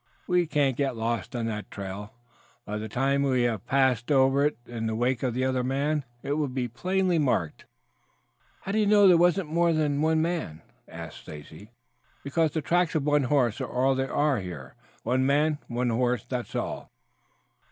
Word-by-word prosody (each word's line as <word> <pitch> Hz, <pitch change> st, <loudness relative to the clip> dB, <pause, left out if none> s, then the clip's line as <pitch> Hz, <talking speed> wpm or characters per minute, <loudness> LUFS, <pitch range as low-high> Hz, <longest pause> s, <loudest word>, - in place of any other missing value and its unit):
"We 180 Hz, -2 st, +2 dB
can't 145 Hz, -4 st, +1 dB
get 135 Hz, -1 st, -1 dB
lost 115 Hz, +2 st, -2 dB
on 115 Hz, -2 st, -2 dB
that 105 Hz, -2 st, -4 dB
trail. 100 Hz, +1 st, -7 dB, 0.5 s
By 105 Hz, +1 st, -4 dB
the 110 Hz, +1 st, -6 dB
time 135 Hz, +5 st, +1 dB
we 130 Hz, -3 st, +2 dB
have 115 Hz, -5 st, -2 dB
passed 130 Hz, -1 st, +2 dB
over 135 Hz, 0 st, +4 dB
it 150 Hz, -, -5 dB
in 115 Hz, -2 st, -4 dB
the 110 Hz, -, -2 dB
wake 120 Hz, +1 st, 0 dB
of 125 Hz, -3 st, -1 dB
the 130 Hz, +1 st, 0 dB
other 130 Hz, -1 st, 0 dB
man 140 Hz, +3 st, -1 dB, 0.2 s
it -, -, -3 dB
will 150 Hz, -, 0 dB
be 125 Hz, -1 st, -2 dB
plainly 185 Hz, +7 st, 0 dB
marked." 125 Hz, -, -1 dB, 1.0 s
"How 195 Hz, -, -5 dB
do 215 Hz, -, +1 dB
you 210 Hz, -, +2 dB
know 205 Hz, -1 st, +6 dB
there 180 Hz, -, +7 dB
wasn't 175 Hz, -1 st, +2 dB
more 170 Hz, 0 st, +3 dB
than 150 Hz, -2 st, 0 dB
one?" 160 Hz, -, 0 dB, 0.2 s
asked -, -, -9 dB
Stacy. 75 Hz, +7 st, -11 dB, 0.5 s
"Because 160 Hz, +3 st, +1 dB
the 155 Hz, +1 st, -3 dB
tracks 175 Hz, 0 st, +1 dB
of 155 Hz, -, +1 dB
one 145 Hz, -2 st, +2 dB
horse 125 Hz, -5 st, +1 dB
are -, -, -3 dB
all 130 Hz, +2 st, +2 dB
there 135 Hz, 0 st, -2 dB
are 145 Hz, -5 st, +1 dB
here. 85 Hz, -9 st, -8 dB, 0.3 s
One 130 Hz, +3 st, +1 dB
man 145 Hz, +2 st, +2 dB
and 120 Hz, -, -6 dB
one 125 Hz, 0 st, +1 dB
horse, 120 Hz, -1 st, 0 dB
that's 125 Hz, -2 st, -4 dB
all." -, -, -4 dB
135 Hz, 190 wpm, -27 LUFS, 120-155 Hz, 1.0 s, there